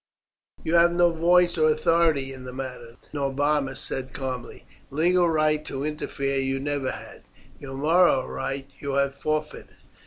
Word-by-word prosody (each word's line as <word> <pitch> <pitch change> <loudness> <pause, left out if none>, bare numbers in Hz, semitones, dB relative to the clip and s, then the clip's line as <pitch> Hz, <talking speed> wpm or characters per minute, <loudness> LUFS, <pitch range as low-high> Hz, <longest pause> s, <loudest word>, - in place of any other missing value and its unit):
"You 160 - -2
have 170 0 +5
no 175 0 +4
voice 175 +1 +3
or 155 0 +5
authority 155 -3 +2
in 130 -1 -10
the 125 - -7
matter," 125 -3 -7 0.2
Norbanus 140 -1 0
said 130 -1 -3
calmly. 130 -3 -6 0.2
"Legal 175 +4 +3
right 155 -1 +2
to 135 0 -4
interfere 140 -2 -2
you 135 0 -1
never 140 -1 -2
had. - - -8 0.4
Your 135 -1 -8
moral 160 -2 +3
right 135 0 -4
you 140 -1 -4
have 140 0 +1
forfeited. 155 +2 -4
145 Hz, 150 wpm, -25 LUFS, 135-165 Hz, 0.4 s, have